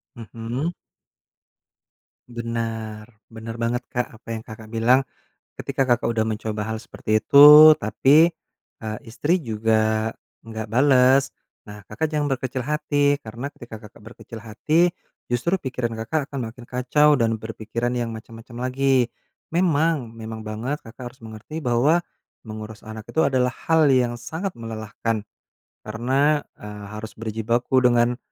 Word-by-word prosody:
Mhm. 120 +8 -4 1.5
Benar, 115 -2 -5 0.2
benar 115 0 -8
banget 120 +2 -1
Kak, 125 -1 -1
apa - - -34
yang 110 - -5
Kakak 110 0 -11
bilang. 125 +4 +3 0.5
Ketika 135 - -1
Kakak 120 -3 +1
udah 115 -1 +1
mencoba 110 -1 -3
hal 110 - -3
seperti 110 -1 -1
itu, 150 +6 +9
tapi, 145 +10 +4 0.5
eee, 110 -1 -5
istri 155 +9 -1
juga 110 -1 0 0.3
enggak 110 -1 -6
bales, 135 +1 +4 0.3
nah, 105 0 -10
Kakak 110 +11 -3
jangan 150 -2 -1
berkecil 130 -1 -2
hati 145 0 +1
karena 120 +3 -7
ketika 120 -6 -11
Kakak 105 - -14
berkecil 110 +2 -11
hati, 135 +10 +1 0.4
justru 170 +10 0
pikiran 120 -5 -4
Kakak 145 +5 -2
akan 130 -5 -4
makin 115 +2 -11
kacau 135 +4 +2
dan 115 -1 +1
berpikiran 110 +2 -4
yang 115 -1 -3
macam-macam 120 +3 -7
lagi. 130 -2 +2 0.4
Memang, 165 -5 +1
memang 110 -1 -8
banget 120 +7 -3
Kakak 120 +2 -9
harus 130 - -23
mengerti 110 +8 -8
bahwa 135 +4 +2 0.5
mengurus 110 0 -9
anak 110 0 -7
itu - - -7
adalah 130 -2 +1 0.2
hal 160 -3 +4
yang 125 -2 +2
sangat 160 +11 -5
melelahkan, 110 -1 -4 0.6
karena, 135 +7 +1 0.2
eee, 105 0 -9
harus 110 +1 -8
berjibaku 115 +3 -1
dengan 120 -1 +3
120 Hz, 135 wpm, -23 LUFS, 110-135 Hz, 1.5 s, itu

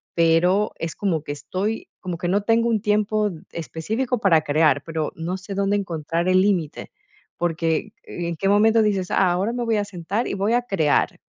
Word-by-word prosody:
pero, 175 +5 +3
es 165 -1 -4
como 170 -7 -1
que 145 - -4
estoy 200 +8 -3
como 180 -2 -5
que 175 - -3
no 200 +2 +2
tengo 230 +2 +2
un 220 -3 +1
tiempo 210 0 +1 0.2
específico 220 - -3
para 170 -6 +4
crear, 150 -2 +2
pero 160 -2 -3
no 175 +3 -3
sé 195 +1 -8
dónde 200 +1 +1
encontrar 170 -2 -2
el 185 0 +4
límite. 185 -6 -1 0.5
Porque, 165 -2 -1
¿en 170 -1 -4
qué 195 - -1
momento 220 +3 +4
dices: 195 -4 0
"Ah, 185 -2 +3
ahora 190 +6 0
me 245 -1 -2
voy 225 - +1
a 205 - +1
sentar 200 +4 -3
y - - -3
voy 200 +4 0
a 245 - +3
crear?". 175 -11 +1
185 Hz, 190 wpm, -23 LUFS, 165-210 Hz, 0.5 s, para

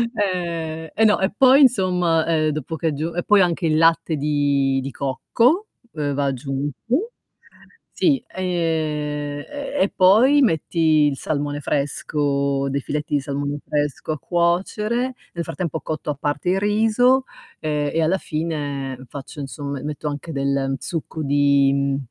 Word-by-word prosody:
Eh. 170 -5 -2
E 220 - +1
no, 210 - +4
e 190 +1 +1
poi 265 +4 +6
insomma, 180 - +3
ehm, 155 -2 +2
dopo 155 +1 -4
che 160 0 -1
è - - -1
g 155 +4 -3
e 175 - -1
poi 205 -1 +5
anche 175 -1 +1
il 155 -1 +2
latte 165 0 +3
di 140 -2 +1
di 135 +1 -5
cocco 230 - +1 0.2
uhm, 145 -2 -2
va 140 +1 0
aggiunto. 140 - -2 0.8
Sì, 275 -7 +1
ehm, 185 - -7 1.0
e 285 -1 -6
e 195 - +3
poi 230 +10 +5
metti 170 - 0 0.3
il 135 - -5
salmone 145 0 -2
fresco, 140 -1 -1
dei 140 - -1
filetti 150 +2 -3
di 145 - +3
salmone 140 +1 -3
fresco 150 +1 -1
a 155 - -6
cuocere. 210 +8 0 0.2
Nel 170 - -3
frattempo 165 -1 -4
cotto 155 -1 -3
a - - -4
parte 145 +4 -2
il 190 - +1
riso, 225 +5 +3 0.4
ehm, 150 -1 -1
e 165 - +1
alla 165 +4 +2
fine 145 -6 -3
faccio 140 +2 -8
insomma 140 0 -5
m - - -10
metto 150 +1 -4
anche 145 +3 -5
del 135 -1 0
succo 160 -1 -4
di 140 -1 +2
155 Hz, 155 wpm, -22 LUFS, 140-185 Hz, 1.0 s, poi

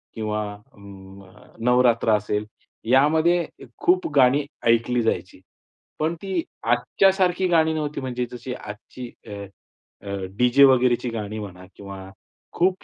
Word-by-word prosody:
किंवा 105 -1 -2
अ, 105 +1 -23 0.8
नवरात्र 120 -2 +3
असेल 105 0 -2 0.4
यामध्ये 160 +6 +4 0.4
खूप 180 +1 +3
गाणी 140 +2 +4 0.2
ऐकली 115 +1 +3
जायची. 95 -4 -2 0.6
पण 160 +2 0
ती 190 -3 -1 0.2
आजच्यासारखी 185 +9 +2
गाणी 160 -2 +3
नव्हती 150 -2 -3
म्हणजे 125 -1 -3
जशी 125 +1 -6
आजची 120 +3 -9 0.2
अ, 100 -1 -7 0.9
डी-जे 125 +3 +5
वगैरेची 125 -2 +3
गाणी 110 -1 -5
म्हणा 90 -3 -9
किंवा 100 -1 -9 0.6
खूप 185 +2 +1
125 Hz, 110 wpm, -23 LUFS, 110-160 Hz, 0.9 s, डी-जे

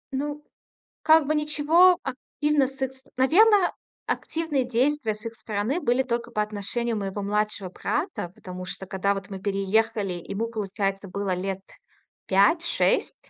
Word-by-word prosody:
Ну, 295 +2 -3 0.6
как 315 -1 +6
бы 310 - +2
ничего 305 +4 +4
активно 285 +1 0
с 270 0 -13
их 265 0 -2
ст 265 - -22 0.2
Наверное, 380 +8 +5 0.3
активные 320 -5 -1
действия 250 -1 0
с 215 +2 -16
их 230 - -4
стороны 220 +6 -2
были 245 +2 +2
только 240 -1 -2
по 210 -2 +1
отношению 215 +3 -2
моего 200 0 -3
младшего 210 -1 -1
брата. 185 - -3
Потому 185 0 -8
что, 190 - -6
когда 195 +2 0
вот 195 0 -7
мы 195 - -5
переехали, 200 +1 0
ему, 195 +6 -4
получается, 195 -2 -2
было 195 0 -2
лет 190 +1 -3 0.7
5-6. 205 - +3
225 Hz, 145 wpm, -25 LUFS, 195-290 Hz, 0.7 s, как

